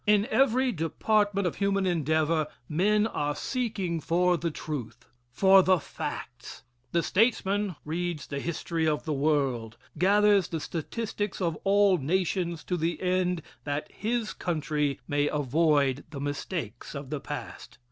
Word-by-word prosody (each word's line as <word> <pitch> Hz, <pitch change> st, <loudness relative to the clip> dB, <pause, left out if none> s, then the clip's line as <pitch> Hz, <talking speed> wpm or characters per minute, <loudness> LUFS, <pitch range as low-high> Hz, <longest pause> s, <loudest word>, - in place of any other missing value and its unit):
In 210 Hz, 0 st, +5 dB
every 260 Hz, -1 st, +3 dB
department 205 Hz, +3 st, +1 dB
of 175 Hz, -, -1 dB
human 195 Hz, -1 st, +1 dB
endeavor 160 Hz, -2 st, +1 dB, 0.2 s
men 210 Hz, +7 st, +2 dB
are 145 Hz, -9 st, -1 dB
seeking 210 Hz, -10 st, -2 dB
for 180 Hz, +3 st, +2 dB
the 170 Hz, 0 st, -1 dB
truth 125 Hz, -7 st, -6 dB, 0.2 s
for 190 Hz, +9 st, +6 dB
the 185 Hz, 0 st, +4 dB
facts. 160 Hz, -, -7 dB, 0.3 s
The 170 Hz, -, +1 dB
statesman 205 Hz, -3 st, +1 dB
reads 170 Hz, 0 st, -3 dB
the 140 Hz, -, -4 dB
history 165 Hz, +1 st, -2 dB
of 150 Hz, +1 st, 0 dB
the 155 Hz, -, -1 dB
world, 135 Hz, -6 st, 0 dB, 0.2 s
gathers 205 Hz, +1 st, +4 dB
the 165 Hz, -, -3 dB
statistics 205 Hz, +6 st, -4 dB
of 170 Hz, -4 st, 0 dB
all 200 Hz, -2 st, +4 dB
nations 170 Hz, +2 st, -1 dB
to 180 Hz, -, -2 dB
the 170 Hz, +1 st, -1 dB
end 180 Hz, -2 st, 0 dB, 0.2 s
that 145 Hz, +1 st, -3 dB
his 225 Hz, 0 st, -2 dB
country 150 Hz, -4 st, -1 dB
may 145 Hz, 0 st, +1 dB
avoid 145 Hz, -1 st, +2 dB
the 140 Hz, -, -7 dB
mistakes 145 Hz, +4 st, -4 dB
of 140 Hz, -1 st, -7 dB
the 150 Hz, -, -2 dB
past. -, -, -7 dB
170 Hz, 140 wpm, -28 LUFS, 150-195 Hz, 0.3 s, for